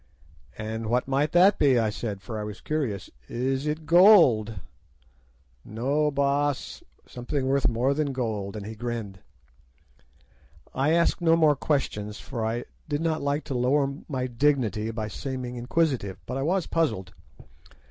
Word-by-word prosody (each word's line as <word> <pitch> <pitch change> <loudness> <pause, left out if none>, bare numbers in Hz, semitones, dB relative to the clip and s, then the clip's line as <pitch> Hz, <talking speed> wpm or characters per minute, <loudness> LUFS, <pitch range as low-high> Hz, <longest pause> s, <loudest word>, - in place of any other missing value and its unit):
"'And 110 +1 -4
what 125 +3 0
might 140 +3 +1
that 190 +3 +5
be?' 135 -4 +4
I 110 -2 +1
said, 105 -3 -5
for 110 -3 -5
I - - -3
was 105 0 -7
curious. 130 - -3 0.2
'Is 130 +4 -2
it 155 +1 -3
gold?' 155 - +6 1.0
"'No, 140 +7 0
Baas, 140 0 -1 0.2
something 130 +3 -3
worth 135 -3 +2
more 120 +4 +1
than 145 -1 -1
gold,' 110 -6 -3
and 105 -2 -6
he 110 - -6
grinned. 110 -4 -5 1.5
"I 135 +4 +1
asked 170 +1 +2
no 165 -1 +4
more 155 -3 +4
questions, 105 -8 -2
for 120 -5 -5
I 115 +2 -2 0.2
did 145 0 -1
not 160 -1 0
like 140 +2 -1
to 140 - -5
lower 135 +3 +1 0.2
my 130 -3 -2
dignity 120 -4 0
by 110 -1 -4
seeming 125 +2 -5
inquisitive, 125 - -1
but 125 - -5
I 135 - -2
was 180 +5 0
puzzled. 95 - -1
130 Hz, 150 wpm, -26 LUFS, 110-150 Hz, 1.5 s, gold